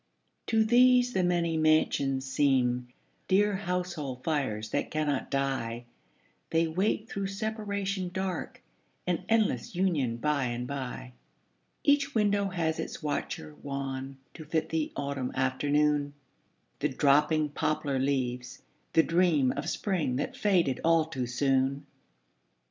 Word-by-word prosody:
To 220 -1 +3
these 250 +1 +5
the 185 - +1
many 170 -2 +1
mansions 140 -4 +2
seem 130 -3 +1 0.4
Dear 205 +2 +3
household 175 -9 -3
fires 120 -9 -1
that - - -1
cannot 150 -3 -1
die; 130 -4 -2 0.6
They 165 +1 +2
wait 195 +6 0
through 195 -2 -3
separation 200 -2 -3
dark 185 -1 -4 0.4
An 180 0 -1
endless 215 - +1
union 155 -11 +1
by 145 +1 0
and 120 0 -3
by. 125 - -5 0.7
Each 285 -1 +2
window 205 -2 +2
has 165 -3 -1
its - - -5
watcher 150 0 -3
wan 135 -1 -4 0.2
To 160 - -9
fit 160 +1 -1
the 160 -1 -1
autumn 140 -3 -3
afternoon, 145 +2 +1 0.6
The - - +1
dropping 150 +2 +3
poplar 150 -2 -1
leaves, 125 -2 -2 0.3
the 160 - +6
dream 165 -7 +3
Of 140 - -3
spring 180 -11 -1
that - - -3
faded 175 -11 +2
all 165 -1 +4
too 130 -6 -4
soon. 135 +2 +1
150 Hz, 125 wpm, -29 LUFS, 135-185 Hz, 0.7 s, the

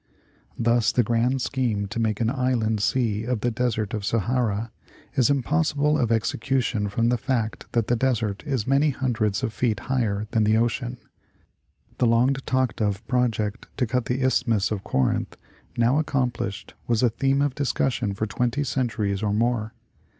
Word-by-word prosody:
Thus 115 -1 +2
the 125 - +2
grand 120 +4 +1
scheme 120 -7 -1
to 115 - -4
make 110 -2 0
an 115 - +1
inland 125 -5 0
sea 110 -1 +1
of 120 -2 -2
the 120 - +1
Desert 110 -3 -1
of 105 - -2
Sahara 115 0 0 0.4
is 130 -1 +3
impossible 150 +1 +1
of 120 -6 +1
execution 115 -1 0
from 115 +3 +1
the 120 -1 +1
fact 115 -4 -2
that 115 -2 +2
the 120 - +1
desert 115 -5 0
is 130 -7 -1
many 140 +3 +3
hundreds 115 -7 -1
of 110 - -1
feet 110 -4 0
higher 110 -6 -1
than 110 - +2
the 110 +1 +3
ocean. 120 +2 -1 1.0
The 125 - +4
long 120 +4 +4
talked 130 -3 -1
of 105 0 -1
project 120 -3 0
to 130 - +2
cut 125 +1 -1
the 130 +2 -1
Isthmus 115 -5 +1
of 100 -3 -3
Corinth, 65 -1 0 0.4
now 120 +5 +3
accomplished, 125 -9 -2
was 115 0 +1
a 120 - +4
theme 135 +4 +1
of 145 -2 0
discussion 125 -6 -1
for 110 - -1
twenty 125 +6 -1
centuries 110 -7 -1
or 105 -2 0
more. 115 0 0
120 Hz, 165 wpm, -24 LUFS, 110-130 Hz, 1.0 s, The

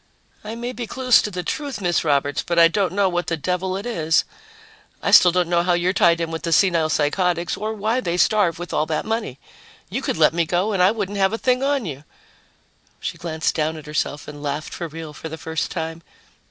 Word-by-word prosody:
"I 215 +2 -6
may 240 +1 -4
be 245 -2 -6
close 255 -1 +4
to - - -3
the 180 -2 -5
truth, 280 - -4
Miss 175 -3 +1
Roberts, 145 -2 +1
but 170 - -3
I 165 0 +8
don't 185 +3 0
know 200 0 +2
what 175 -1 -1
the 165 - -1
devil 185 +4 -2
it 200 - -6
is. 165 -9 +1 0.7
I - - -1
still 180 - +8
don't 180 -1 +1
know 170 0 +2
how 175 0 +1
you're 175 +2 +1
tied 170 -3 +4
in 165 -1 -2
with 160 - -4
the 170 - -3
senile 165 -2 +3
psychotics 170 +3 0
or 215 +2 -4
why 220 +4 0
they 175 -8 -2
starve 185 -4 +3
with 175 +1 -7
all 155 - +1
that 155 -1 -2
money. 220 - -3 0.5
You 250 +7 -2
could - - -2
let 155 0 +4
me 170 0 +2
go 180 +5 0
and 190 - +1
I 180 - +6
wouldn't 205 -2 -3
have 195 +2 +2
a - - 0
thing 255 +1 +1
on 275 -3 0
you." 145 -4 -6 1.0
She - - -5
glanced 160 -2 -1
down 160 0 -1
at 155 - -10
herself 150 -1 -3
and 145 -1 -9
laughed 145 +1 -4
for 170 - -4
real 160 -1 -8
for 160 - -8
the 160 - -7
first 160 0 -3
time. 165 -1 -5
175 Hz, 235 wpm, -22 LUFS, 160-205 Hz, 1.0 s, I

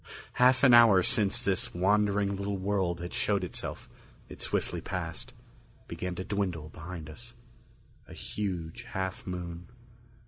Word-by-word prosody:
Half 130 +2 +4
an 130 -3 +8
hour 115 -6 +8
since 110 +5 +1
this 95 -5 -1
wandering 100 +1 +2
little 100 +1 -2
world 95 -3 -1
had 85 - -6
showed - - +1
itself, - - -5 0.4
it - - -10
swiftly - - -1
passed, 85 -3 -5 0.6
began 90 -1 -4
to 95 - -4
dwindle 95 -7 -2
behind 80 0 -8
us. 120 +9 -11 0.7
A - - -11
huge 90 -6 -4
half 95 0 -4
moon. 90 -1 -5
95 Hz, 135 wpm, -30 LUFS, 85-105 Hz, 0.7 s, an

